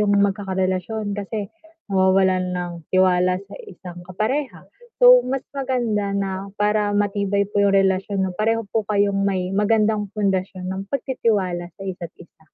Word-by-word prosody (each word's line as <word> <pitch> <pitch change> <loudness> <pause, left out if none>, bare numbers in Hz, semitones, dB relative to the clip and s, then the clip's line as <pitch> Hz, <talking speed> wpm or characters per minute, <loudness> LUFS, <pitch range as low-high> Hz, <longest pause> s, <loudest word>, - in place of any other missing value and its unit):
yung 205 -1 +3
magkakarelasyon 195 +1 -1
kasi 205 0 -4 0.4
nawawalan 190 -1 +2
ng 175 -1 -4 0.2
tiwala 185 -1 +3
sa - - -13
isang 175 - -10
kapareha, 215 - -2 0.4
so - - +9
mas 270 0 -2
maganda 240 -7 -1
na, 195 0 -3
para 210 0 +1
matibay 200 0 +1
po 205 +1 -3
yung 200 -1 +3
relasyon 195 0 +1
'no, 190 - -2
pareho 225 +4 0
po 210 +2 -1
kayong 200 -1 +2
may 185 -2 -1
magandang 210 0 +2
pundasyon 190 -3 -1
ng 190 +1 -4
pagtitiwala 205 -10 -1
sa - - -10
isa't 180 -3 -6
isa. 165 -2 -18
200 Hz, 145 wpm, -22 LUFS, 185-210 Hz, 0.4 s, so